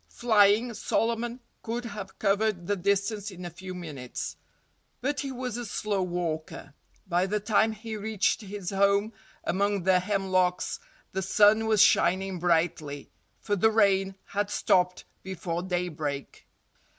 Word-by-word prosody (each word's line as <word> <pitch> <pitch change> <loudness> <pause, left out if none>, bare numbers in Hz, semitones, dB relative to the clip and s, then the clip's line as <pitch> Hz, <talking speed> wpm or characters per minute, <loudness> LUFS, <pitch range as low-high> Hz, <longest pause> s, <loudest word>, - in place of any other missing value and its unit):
Flying, 220 0 +3
Solomon 235 +3 -1 0.2
could 240 +1 -4
have 205 -4 -7
covered 200 -2 +1
the 205 - 0
distance 200 +2 0
in 180 -2 -9
a 175 - -5
few 185 +2 -8
minutes. 145 -8 -6 0.6
But 285 +2 -1
he 275 -1 -3
was 250 -2 -4
a 240 - -4
slow 205 -1 -1
walker. 170 -5 -4 0.3
By 180 +1 +1
the 210 +2 0
time 215 +1 +2
he 220 +1 -7
reached 215 +1 0
his 200 -3 -6
home 200 +2 +2 0.3
among 200 0 0
the 185 0 +4
hemlocks 185 -2 0 0.3
the 190 - -2
sun 210 +3 +4
was 215 -3 +6
shining 185 +1 +2
brightly—for 165 +3 -2
the 215 +3 +4
rain 195 -3 +3
had 205 0 -2
stopped 180 -2 +1 0.2
before 175 -2 -4
daybreak. 165 -6 -4
195 Hz, 135 wpm, -28 LUFS, 180-215 Hz, 0.6 s, was